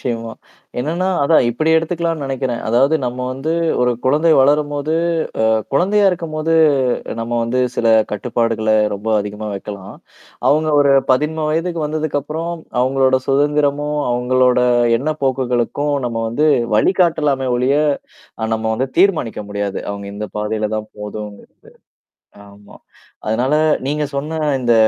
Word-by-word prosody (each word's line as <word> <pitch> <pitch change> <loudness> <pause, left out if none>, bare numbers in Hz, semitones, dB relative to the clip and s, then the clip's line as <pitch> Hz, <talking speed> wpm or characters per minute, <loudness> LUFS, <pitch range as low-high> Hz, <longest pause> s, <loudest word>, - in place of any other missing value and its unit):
நிச்சயமா. 115 -2 -3 0.5
என்னன்னா 170 +7 -1 0.2
அதான் 140 -4 +4
இப்படி 155 +7 0
எடுத்துக்கலான்னு 165 -1 -1
நெனைக்கிறேன். 130 -3 -3
அதாவது 135 +7 +3
நம்ம 125 +1 -3
வந்து 135 +5 -3 0.3
ஒரு 125 0 +3
குழந்தை 150 +5 +3
வளரும்போது, 145 +2 +2 0.5
அ - - +3 0.2
குழந்தையா 200 +8 +2
இருக்கும்போது 165 -2 -3 0.7
நம்ம 115 +1 -4
வந்து 125 +2 -1 0.2
சில 115 - +1 0.2
கட்டுப்பாடுகள 115 0 -1 0.2
ரொம்ப 105 +3 -5
அதிகமா 105 +1 -5
வைக்கலாம். 100 -1 -8 0.5
அவங்க 155 +2 +2
ஒரு 140 -1 +4 0.2
13 150 +4 0
வயதுக்கு 165 0 -1
வந்ததுக்கப்புறம், 155 +2 -3 0.3
அவங்களோட 130 0 +2
சுதந்திரமும், 145 +1 +1
அவங்களோட 125 +1 +2 0.4
எண்ண 155 +4 -1
போக்குகளுக்கும் 130 +2 0
நம்ம 115 -1 -4
வந்து 150 +7 +1 0.3
வழிகாட்டலாம 150 - +2
ஒளிய 130 +3 +2 0.7
அ 110 0 -2
நம்ம 110 0 -5
வந்து 130 +3 -1
தீர்மானிக்க 175 - +2
முடியாது. 100 -1 -3
அவங்க 100 0 -7
இந்த 105 0 -5
பாதையில 105 0 -2
தான் 110 0 -7
போகணும்கிறது. 105 0 -8 0.9
ஆமா. 100 0 -16 0.5
அதனால 125 +7 +1 0.3
நீங்க 150 +2 -1
சொன்ன 150 +3 -3 0.2
இந்த 120 -2 +2
135 Hz, 125 wpm, -18 LUFS, 115-155 Hz, 0.9 s, அதான்